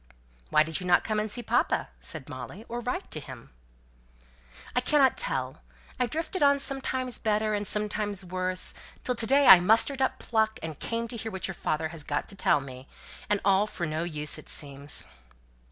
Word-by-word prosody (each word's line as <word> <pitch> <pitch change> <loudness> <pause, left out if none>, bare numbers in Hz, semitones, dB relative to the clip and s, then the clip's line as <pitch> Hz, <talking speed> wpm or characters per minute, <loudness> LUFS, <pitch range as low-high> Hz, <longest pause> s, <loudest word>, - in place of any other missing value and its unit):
"Why 155 - +5
did 160 0 -2
you 180 - -5
not 175 0 +5
come 215 -1 -1
and 215 +1 -2
see 240 +3 -3
papa?" 235 +3 +1
said 155 -5 -5
Molly; 145 - -8
"or 240 - -4
write 250 +10 -4
to 155 - -1
him?" 130 -5 -11 1.2
"I 250 - +3
cannot 280 -3 +4
tell. 130 - -3 0.4
I 250 - +2
drifted 330 +6 -3
on, 280 -1 +5
sometimes 260 -2 0
better, 215 0 +1
and 205 -1 -1
sometimes 210 -2 -2
worse, 185 0 -2 0.3
till 250 - +1
to 230 -2 0
day 280 +3 +5
I 185 - +11
mustered 225 +8 +3
up 265 - +1
pluck, 220 -1 0
and 160 -3 -5
came 230 0 -2
to 240 - -4
hear 225 0 -5
what 190 -2 -2
your 190 - -4
father 160 -2 -2
has 160 -2 -5
got 145 0 -2
to 200 - -8
tell 150 -6 +3
me: 130 0 -10 0.4
and 205 - +2
all 200 +1 +4
for 175 -4 -4
no 155 0 -2
use 150 -3 -3
it - - -12
seems." 140 0 -3
205 Hz, 195 wpm, -28 LUFS, 160-240 Hz, 1.2 s, I